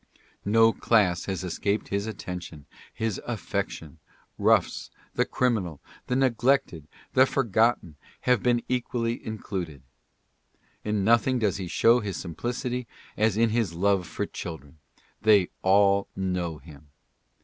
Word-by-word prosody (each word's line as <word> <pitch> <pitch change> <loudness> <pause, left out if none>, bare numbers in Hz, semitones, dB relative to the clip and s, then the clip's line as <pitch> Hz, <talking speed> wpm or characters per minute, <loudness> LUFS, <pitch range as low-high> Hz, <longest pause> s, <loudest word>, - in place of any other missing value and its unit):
No 115 +2 +5
class 95 -6 +2
has 95 -2 -3
escaped 100 +4 -2
his 100 +2 -1
attention, 90 -7 -7 0.3
his 110 -3 -3
af 120 -3 -4
fection: 80 -5 -4 0.4
roughs, - - +2 0.2
the - - +1
criminal, 100 - -1 0.3
the 125 - 0
neglected, 130 - +1 0.3
the 130 +1 +6
forgotten, 115 - +1 0.2
have 125 -4 +2
been 120 -1 +2
equally 120 -2 -2
included. 95 - -5 1.0
In 105 -2 0
nothing 115 +4 +3
does 105 -6 0
he 95 -2 -5
show 115 +7 +4
his 100 -6 -4
simplicity 120 - -4 0.3
as 110 -1 +1
in 115 -1 +3
his 110 -7 0
love 95 -1 +1
for - - -3
children. 80 -2 -8 0.4
They 105 -4 +5
all 100 +1 +4
know 90 -4 -2
him. 75 0 -15
105 Hz, 125 wpm, -26 LUFS, 90-115 Hz, 1.0 s, the